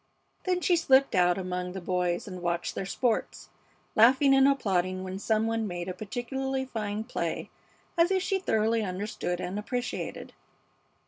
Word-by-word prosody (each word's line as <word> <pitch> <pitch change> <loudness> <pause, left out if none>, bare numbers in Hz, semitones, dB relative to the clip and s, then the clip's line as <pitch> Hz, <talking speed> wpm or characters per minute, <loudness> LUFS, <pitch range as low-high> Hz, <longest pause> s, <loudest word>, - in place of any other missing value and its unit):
Then 365 -1 +1
she 355 - +3
slipped 275 -4 +4
out 180 -1 +4
among 180 -1 -3
the 190 - -4
boys 180 0 -1
and 185 -2 -7
watched 170 0 -1
their 190 - -4
sports, 235 +3 -1 0.5
laughing 260 +5 +6
and 270 0 +6
applauding 185 -8 +1
when 190 +1 -5
some 220 +1 +1
one 225 -1 -1
made 175 -1 -4
a 185 - -3
particularly 265 +6 -3
fine 215 -4 -3
play, 245 - -3 0.4
as 335 +1 +4
if 380 -1 +1
she 385 +1 0
thoroughly 225 - +1
understood 185 -2 -3
and 185 +3 -3
appreciated. 245 +3 -4
215 Hz, 155 wpm, -28 LUFS, 185-265 Hz, 0.5 s, laughing